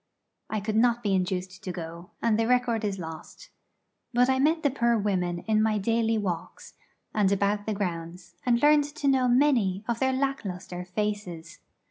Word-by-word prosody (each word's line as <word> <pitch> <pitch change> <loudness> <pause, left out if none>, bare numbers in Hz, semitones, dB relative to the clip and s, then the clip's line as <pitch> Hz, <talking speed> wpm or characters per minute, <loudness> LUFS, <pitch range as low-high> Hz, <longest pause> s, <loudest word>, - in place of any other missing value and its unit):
I 215 - -1
could 215 +1 -1
not 240 +1 +3
be 205 -2 +1
induced 185 0 -2
to 185 - -3
go, 170 0 -8
and 225 -2 +2
the 225 - +2
record 245 -3 +2
is 200 -2 -1
lost. 165 - -9 0.6
But 250 +2 +4
I 260 - +1
met 315 +4 +2
the 285 - +3
poor 235 -3 +2
women 180 -4 -1
in 215 +1 +1
my 215 -1 +2
daily 225 +2 +1
walks, 180 -5 -4 0.4
and 205 -2 +2
about 200 +1 0
the 215 - 0
grounds, 175 -2 -5
and 240 -1 +2
learned 295 0 +6
to 290 0 -4
know 265 -2 +3
many 240 -7 +3
of 235 -1 -1
their 265 0 +2
lack 270 +1 -1
lustre 180 -2 -6
faces. 180 -3 -4
215 Hz, 180 wpm, -27 LUFS, 185-245 Hz, 0.6 s, learned